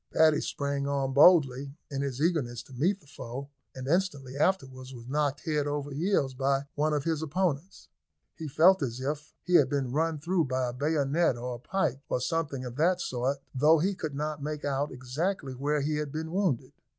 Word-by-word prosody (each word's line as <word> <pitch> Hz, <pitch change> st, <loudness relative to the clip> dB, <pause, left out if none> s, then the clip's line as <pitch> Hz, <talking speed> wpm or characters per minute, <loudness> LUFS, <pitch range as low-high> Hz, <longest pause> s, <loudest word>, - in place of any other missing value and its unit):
Paddy 155 Hz, -1 st, +4 dB
sprang 140 Hz, -1 st, -2 dB
on 135 Hz, -1 st, 0 dB
boldly, 140 Hz, -3 st, +5 dB, 0.2 s
in 140 Hz, -1 st, -2 dB
his 135 Hz, -2 st, -3 dB
eagerness 140 Hz, -8 st, 0 dB
to 135 Hz, -, -16 dB
meet 175 Hz, +11 st, +1 dB
the 175 Hz, -, -24 dB
foe, 135 Hz, -1 st, -7 dB, 0.3 s
and 130 Hz, 0 st, -6 dB
instantly 145 Hz, -6 st, 0 dB
afterwards 135 Hz, -6 st, -1 dB
was 120 Hz, 0 st, -11 dB
knocked 145 Hz, 0 st, 0 dB
head 150 Hz, -2 st, 0 dB
over 145 Hz, 0 st, -3 dB
heels 145 Hz, -3 st, +1 dB
by 135 Hz, +1 st, +1 dB
one 150 Hz, +1 st, +1 dB
of 145 Hz, -2 st, 0 dB
his 160 Hz, -1 st, -1 dB
opponents. 160 Hz, +1 st, -2 dB, 0.5 s
He 160 Hz, -, -6 dB
felt 170 Hz, +6 st, +5 dB
as 125 Hz, -3 st, -2 dB
if 150 Hz, +3 st, -4 dB
he 180 Hz, -, -3 dB
had 145 Hz, -6 st, +6 dB
been 135 Hz, -3 st, -1 dB
run 160 Hz, +3 st, +1 dB
through 170 Hz, +2 st, +1 dB
by 130 Hz, -1 st, -1 dB
a -, -, -6 dB
bayonet 145 Hz, +1 st, +1 dB
or 125 Hz, +1 st, -4 dB
a 120 Hz, -, -7 dB
pike, 140 Hz, -3 st, -1 dB
or -, -, +1 dB
something 145 Hz, -2 st, -2 dB
of 125 Hz, 0 st, -7 dB
that 175 Hz, +4 st, +3 dB
sort, 135 Hz, -2 st, -2 dB
though 150 Hz, +5 st, +5 dB
he 185 Hz, +6 st, +1 dB
could 155 Hz, -6 st, -5 dB
not 150 Hz, 0 st, -3 dB
make 150 Hz, 0 st, -4 dB
out 140 Hz, +1 st, -1 dB
exactly 135 Hz, +4 st, -3 dB
where 145 Hz, +3 st, 0 dB
he 150 Hz, +2 st, 0 dB
had 150 Hz, -2 st, -3 dB
been 160 Hz, +2 st, -4 dB
wounded. 180 Hz, -, 0 dB
145 Hz, 200 wpm, -29 LUFS, 135-160 Hz, 0.5 s, had